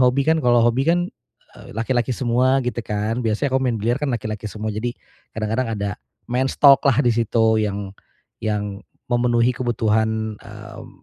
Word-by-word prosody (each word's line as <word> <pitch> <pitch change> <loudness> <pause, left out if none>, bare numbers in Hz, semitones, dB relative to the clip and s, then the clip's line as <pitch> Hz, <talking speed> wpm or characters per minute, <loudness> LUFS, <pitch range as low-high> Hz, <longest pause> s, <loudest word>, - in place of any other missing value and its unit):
hobi. 125 +2 +3
Kan, 160 - +4
kalau 120 -1 +5
hobi 120 +3 +2
kan, 175 +1 +2 0.5
eee, - - -12
laki-laki 120 +2 0
semua 130 +2 +2
gitu 120 -1 -2
kan, 105 +3 -2
biasanya 110 +5 0
kalau 130 - +2
main 120 -3 0
biliar 120 +4 +1
kan 145 -2 -1
laki-laki 110 -2 -4
semua, 110 +1 -5
jadi 120 +3 -2 0.4
kadang-kadang 110 +3 -1
ada 100 -1 -2 0.4
men's 130 +2 0
talk-lah 140 -1 +6
di 120 - +4
situ 110 -1 +2
yang 100 -1 -4 0.5
yang 105 -1 -2 0.3
memenuhi 120 0 +2
kebutuhan, 110 -2 0
mmm, - - -11
120 Hz, 160 wpm, -21 LUFS, 110-125 Hz, 0.5 s, talk-lah